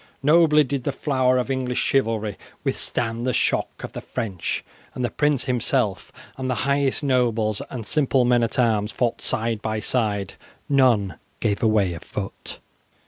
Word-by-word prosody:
Nobly 150 0 +5
did 135 -1 -3
the 140 - 0
flower 130 -2 +1
of 125 +1 -1
English 130 -2 -1
chivalry 110 -6 +1 0.3
withstand 115 0 -2
the 130 - +1
shock - - 0
of - - -5
the - - -5
French, 95 -6 -3 0.3
and 125 - -1
the - - -3
prince 145 -3 +1
himself 125 -5 0 0.3
and 130 -1 -3
the 125 - +1
highest 140 +1 +1
nobles 115 -6 +1
and 120 -5 -6
simple 135 -3 +2
men 120 0 +4
at 115 -2 -1
arms 110 -4 +2
fought 120 -2 -1
side 115 -1 -1
by 110 -1 -2
side. 105 -4 -1 0.3
None 120 - +3 0.2
gave 100 -2 0
away 105 -5 +3
a 85 - -6
foot. - - -7
125 Hz, 160 wpm, -23 LUFS, 110-135 Hz, 0.3 s, Nobly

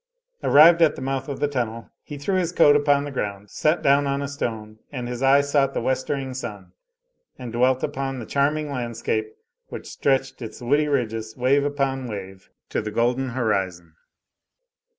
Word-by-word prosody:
Arrived 165 +4 +7
at 160 - +5
the - - -8
mouth 135 +1 -3
of 140 - -5
the 145 - +1
tunnel, 115 -5 -4
he 145 - -9
threw 145 +8 -2
his 180 -3 +1
coat 145 -4 +5
upon 145 -1 +3
the 145 - -6
ground, 100 -5 -4
sat 155 +1 +1
down 140 0 +4
on 140 0 0
a 140 - -3
stone, 110 -6 -5
and 125 -4 -5
his 125 0 -5
eye 135 +1 +5
sought 140 -1 +1
the - - +1
westering 130 +2 -2
sun 105 -8 -7 0.7
and 120 -2 -7
dwelt 125 +2 +2
upon 135 0 -3
the 120 - -6
charming 145 +4 0
landscape 415 - -3 0.3
which - - -8
stretched 135 -1 -1
its 110 -2 -7
woody 145 +5 +1
ridges, 115 -5 -2
wave 135 +3 +3
upon 135 -2 -1
wave, 95 -3 -8 0.2
to - - -2
the 105 - -4
golden 120 +4 0
horizon. 95 -9 -2
135 Hz, 175 wpm, -23 LUFS, 115-145 Hz, 0.7 s, Arrived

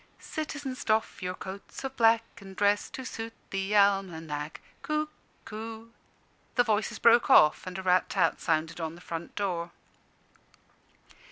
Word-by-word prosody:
"Citizens, 290 -4 -5
doff 220 0 0
your 180 0 -3
coats 195 +7 -8
of 265 0 -4
black, 230 -1 +5 0.2
And 195 -1 -11
dress 205 +1 +2
to 260 - -7
suit 225 -2 -5 0.2
the 195 +2 -1
almanack 165 -7 +1 0.2
Cuckoo 230 -7 -5 0.3
" - - -37
The 245 - +5
voices 215 -2 0
broke 235 0 +5
off, 155 +4 +6
and 185 0 -5
a 190 - -5
rat 180 -1 +3
tat 175 -5 +1
sounded 160 +1 0
on 160 0 -3
the - - -13
front 170 -1 -6
door. 175 -4 -2
200 Hz, 145 wpm, -29 LUFS, 175-230 Hz, 0.3 s, off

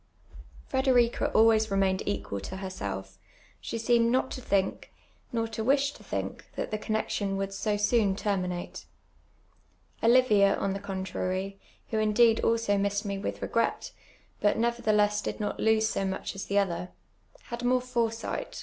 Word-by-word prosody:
Fnderica 255 -3 +3
always 220 0 +5
remained 195 -1 +1
equal 100 0 -2
to 185 - -7
herself; 100 - -6 0.4
she - - -5
ficoinecl 230 0 +3
not 260 +2 +1
to 255 - -5
think, 195 -4 -1 0.4
nor 230 -1 -1
to 225 0 -4
wish 275 +3 +3
to - - -15
think, - - -5
that - - -3
the 215 - -2
connexion, 205 -2 -1
would 195 0 -3
so 205 +1 -1
soon 205 -1 +2
tenninate. 185 -4 -3 1.2
Olivia, 225 -5 +5
on 195 - -1
the 195 - -4
contrar}*, 190 0 -3 0.4
who 220 - +1
indeed 220 +1 +4
also 230 -3 +1
missed 200 +1 0
me 200 -1 -3
with 200 - -4
refi^ret, - - -1 0.5
but 205 - +2
nevertheless 215 -3 +2
did - - -4
not 210 - -3
lose 220 0 +3
so 195 - -1
much 190 0 -3
as 195 - -6
the 200 - -1
other, 180 -3 0 0.6
had 240 +1 -4
more 250 +1 +3
foresiijht. 235 -2 -2
210 Hz, 150 wpm, -28 LUFS, 195-230 Hz, 1.2 s, always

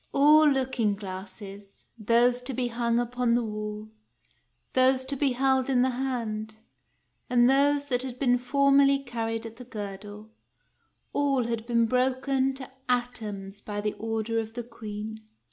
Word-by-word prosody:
All 300 +2 +6
looking 260 -6 0
glasses, 195 +1 -9
— - - -47
those 240 +3 +3
to 250 0 -4
be 245 0 -1
hung 235 0 0
upon 245 0 0
the 240 - +1
wall, 210 0 -5 0.8
those 260 0 +4
to 270 +2 -2
be 275 -1 +1
held 265 +1 +1
in 250 -2 +3
the 260 - +2
hand, 230 -4 -3 0.7
and 240 -1 +5
those 285 +2 +3
that 250 -3 0
had 255 -1 -5
been 245 -2 +2
formerly 275 +2 +4
carried 230 -4 -4
at 225 0 -9
the 250 - -9
girdle, 210 -1 -8 0.4
— - - -45
all 275 -3 +2
had 230 -1 -3
been 235 -1 +3
broken 260 +2 +1
to 265 -1 -7 0.2
atoms 210 -5 -2
by 205 -1 -5
the 210 0 -1
order 225 0 -1
of 225 0 -6
the 240 - -4
Queen. 220 -2 -7
240 Hz, 160 wpm, -27 LUFS, 215-260 Hz, 0.8 s, All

